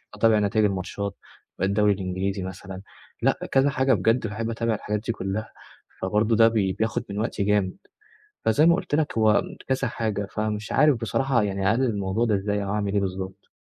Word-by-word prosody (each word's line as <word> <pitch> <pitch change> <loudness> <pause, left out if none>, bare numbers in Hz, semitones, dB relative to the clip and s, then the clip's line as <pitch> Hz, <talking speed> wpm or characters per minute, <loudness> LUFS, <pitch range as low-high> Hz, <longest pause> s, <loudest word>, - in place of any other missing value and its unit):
أتابع 110 0 +4
نتايج 105 +1 +2
الماتشات 100 0 -3 0.4
الدوري 100 +2 +3
الإنجليزي 95 0 -3
مثلًا، 95 0 -7 0.4
لأ - - +2
كذا 135 +1 +4
حاجة 130 -1 +2
بجد 115 +4 +2
باحب 110 +2 -3
أتابع 115 -1 -1
الحاجات 105 0 -3
دي 115 - 0
كلها، 100 +1 -4 0.5
فبرضه 105 +4 +1
ده 115 0 +6
بي 100 -5 +1
بياخد 110 +3 -1
من 100 +1 -4
وقتي 110 -2 -1
جامد، 100 -2 +1 0.7
فزي 130 +9 +4
ما 170 - +6
قُلت - - -3
لك 150 -6 0
هو 110 -1 +4 0.3
كذا 130 -1 0
حاجة، 105 -3 -2
فمش 105 -1 -3
عارف 150 -2 +4
بصراحة 120 +2 0
يعني 100 -1 0
أقلل 125 +4 +2
الموضوع 100 +1 0
ده 110 - +2
إزاي 100 +1 -1
أو 100 - -4
أعمل 100 -2 -1
إيه 100 - +3
بالضبط. 95 +1 -5
105 Hz, 180 wpm, -25 LUFS, 100-115 Hz, 0.7 s, ده